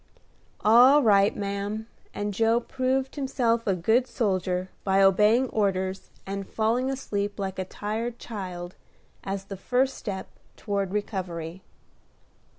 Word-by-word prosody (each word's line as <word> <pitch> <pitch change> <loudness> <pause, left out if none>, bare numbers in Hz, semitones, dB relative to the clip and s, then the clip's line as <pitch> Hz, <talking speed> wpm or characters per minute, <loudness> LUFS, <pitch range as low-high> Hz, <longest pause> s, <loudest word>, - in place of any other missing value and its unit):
"All 250 +7 +7
right, 200 -2 +4
ma'am;" 200 +2 -3 0.3
and 205 0 -3
Joe 225 +3 +3
proved 260 +1 -1
himself 240 -5 0
a 195 - +3
good 225 +9 +2
soldier 185 -5 -1
by 195 0 +2
obeying 210 +6 +5
orders, 190 -2 -1 0.2
and 195 0 -5
falling 235 +4 +1
asleep 205 -6 -3
like 190 -2 -4
a 185 - -2
tired 225 +5 -4
child, 185 -5 -6 0.5
as 195 0 -4
the 195 -1 -7
first 255 +6 +1
step 195 -3 -5 0.3
toward 200 -3 -2
recovery. 185 -4 -4
205 Hz, 125 wpm, -26 LUFS, 190-235 Hz, 0.5 s, All